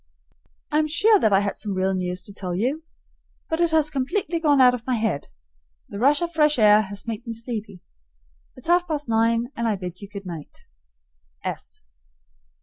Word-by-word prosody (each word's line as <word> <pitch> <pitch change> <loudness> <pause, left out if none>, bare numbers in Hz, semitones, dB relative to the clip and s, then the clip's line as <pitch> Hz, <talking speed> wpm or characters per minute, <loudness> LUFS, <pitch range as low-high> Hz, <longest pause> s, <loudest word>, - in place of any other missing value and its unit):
I 300 - +3
am 310 - +1
sure 415 +7 +4
that 220 - +2
I 195 0 +5
had 200 0 -3
some 205 -3 -3
real 190 +1 +1
news 180 0 -3
to 200 - -12
tell 180 -3 -4
you, 260 - -1 0.7
but 320 +1 0
it 340 - +3
has 310 -2 +2
completely 320 +6 -1
gone 295 -4 +3
out 250 -1 +7
of 240 -1 -6
my 255 - +1
head. 215 -10 -1 0.6
The 200 - -6
rush 285 +6 +3
of 340 - -2
fresh 300 -2 +3
air 210 -1 +6
has 200 -1 -7
made 230 +1 -5
me 230 - -3
sleepy. 220 -5 -6 0.7
It's 255 - -12
half 350 +1 +3
past 295 -4 -3
nine, 230 +2 +1
and 235 0 -1
I 215 - +1
bid 180 -1 -7
you 200 - -9
good 200 -1 -8
night. 165 -5 -9
230 Hz, 190 wpm, -23 LUFS, 200-300 Hz, 0.7 s, out